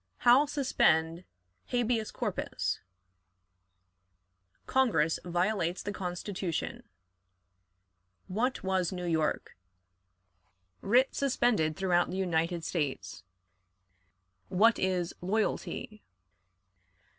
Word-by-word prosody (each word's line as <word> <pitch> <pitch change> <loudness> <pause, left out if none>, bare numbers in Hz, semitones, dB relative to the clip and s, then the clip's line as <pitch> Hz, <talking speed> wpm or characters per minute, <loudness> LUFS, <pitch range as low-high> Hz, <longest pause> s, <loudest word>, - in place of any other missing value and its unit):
How 255 +5 +7
suspend 170 - +1 0.4
Habeas 235 -2 0
Corpus. - - -3 1.9
Congress 165 -13 +2
violates 175 0 -1
the 205 - -3
Constitution. 180 -1 -4 1.4
What 240 +7 -1
was 190 -2 0
New 180 -1 -4
York? 160 -3 -1 1.3
Writ 250 +6 +3
suspended 240 - +1
throughout 175 -1 +2
the 185 - -4
United 170 -2 0
States. 130 - -3 1.3
What 215 +5 +4
is 185 -2 0
"Loyalty"? 215 +3 -2
185 Hz, 75 wpm, -30 LUFS, 170-225 Hz, 1.9 s, How